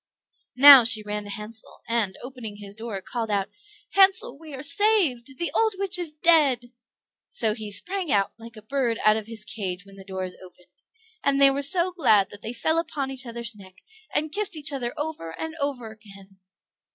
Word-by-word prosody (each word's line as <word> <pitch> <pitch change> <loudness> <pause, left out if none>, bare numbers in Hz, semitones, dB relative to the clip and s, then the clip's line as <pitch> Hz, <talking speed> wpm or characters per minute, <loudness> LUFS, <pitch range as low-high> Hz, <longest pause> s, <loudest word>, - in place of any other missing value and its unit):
Now 275 -1 +10
she 225 -1 +5
ran 210 0 -5
to - - -10
Hansel, 215 +2 -10
and, 225 -5 -1
opening 245 -5 -8
his 205 -1 -9
door, 215 -3 -7
called 230 -2 -5
out, 200 -2 -1 0.4
"Hansel, 385 -8 +3
we 315 -3 -9
are 265 - -8
saved; 330 - +1
the 340 - -2
old 440 -2 +1
witch 380 -2 -1
is 340 -3 -2
dead!" 290 -7 +3 0.6
So 220 -2 +1
he 215 -2 -7
sprang 355 - -2
out, 200 -1 +2
like 230 0 -13
a 215 - -12
bird 240 -1 -2
out 215 0 +5
of 220 -1 -5
his 225 -2 -9
cage 185 -3 -5
when 195 0 -17
the 195 - -11
door 190 -1 -6
is 185 -1 -7
opened; 180 -1 -19 0.4
and 280 0 +1
they 275 -1 +7
were 275 +1 -2
so 345 +5 +4
glad 215 - +3
that 205 - -11
they 225 - -5
fell 320 +7 +1
upon 290 -5 -4
each 265 -1 -4
other's 235 -1 -3
neck, 190 -3 -17 0.3
and 310 0 -2
kissed 405 -2 +1
each 290 -1 -4
other 245 -3 -3
over 295 - -6
and 320 0 -5
over 270 -6 -4
again. 195 -3 -16
235 Hz, 200 wpm, -24 LUFS, 210-300 Hz, 0.6 s, Now